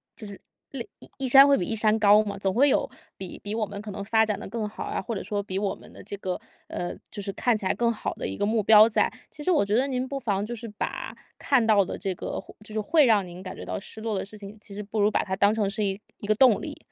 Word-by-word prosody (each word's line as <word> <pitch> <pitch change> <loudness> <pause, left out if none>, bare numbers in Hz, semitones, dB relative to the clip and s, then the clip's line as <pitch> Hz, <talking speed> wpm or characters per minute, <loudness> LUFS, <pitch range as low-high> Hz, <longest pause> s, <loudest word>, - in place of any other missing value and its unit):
就 220 - -9
是 200 -1 -10 0.3
另 260 -4 -5 0.3
一 270 - -2
山 270 +2 +8
会 280 -1 +5
比 175 - -1
一 225 - -2
山 215 0 +2
高 210 0 +6
嘛， 205 - -5
总 195 -1 -1
会 275 +7 +5
有 - - +1 0.3
比 185 -2 -8
比 205 +1 -5
我 225 -1 0
们 200 0 -7
可 210 - -8
能 200 - -5
发 220 +2 +3
展 210 -2 -2
得 - - -7
更 220 +1 -3
好 210 - -7
啊， - - -3
或 230 - -4
者 190 - -4
说 205 -1 -2
比 190 -2 -5
我 200 0 0
们 - - -16
的 - - -12
这 - - -6
个 185 -2 -3 0.3
呃， 175 - -4 0.2
就 205 - -6
是 195 - -4
看 245 +3 +1
起 205 - -6
来 190 - +2
更 235 -1 +1
好 220 - -4
的 - - -4
一 - - -4
个 205 - 0
目 220 +1 +1
标 215 +1 +8
在。 210 - +2 0.2
其 - - -10
实 370 - 0
我 315 - +4
觉 205 +1 0
得 260 +4 +2
您 255 -1 -1
不 275 0 -4
妨 205 -5 -1
就 235 - -5
是 235 0 -7
把 210 -1 -5 0.2
看 265 -5 +2
到 210 -3 +5
的 - - -5
这 195 -2 -2
个 - - -4
会 - - -12
就 215 - -10
是 220 - -1
会 300 +7 +4
让 215 -5 +4
您 175 0 -10
感 185 -1 -7
觉 - - -8
到 - - -3
失 220 +2 -10
落 220 -2 -2
的 - - -3
事 210 +2 -11
情， 205 +1 -10
其 200 - -10
实 210 - -5
不 210 +1 -4
如 205 - +4
把 - - 0
它 190 -2 -3
当 200 +2 +3
成 210 -3 0
是 210 +2 -2
一 195 +1 -2 0.2
一 205 - -7
个 215 - +4
动 250 -3 +5
力。 - - -6
210 Hz, 330 characters per minute, -26 LUFS, 200-230 Hz, 0.3 s, 山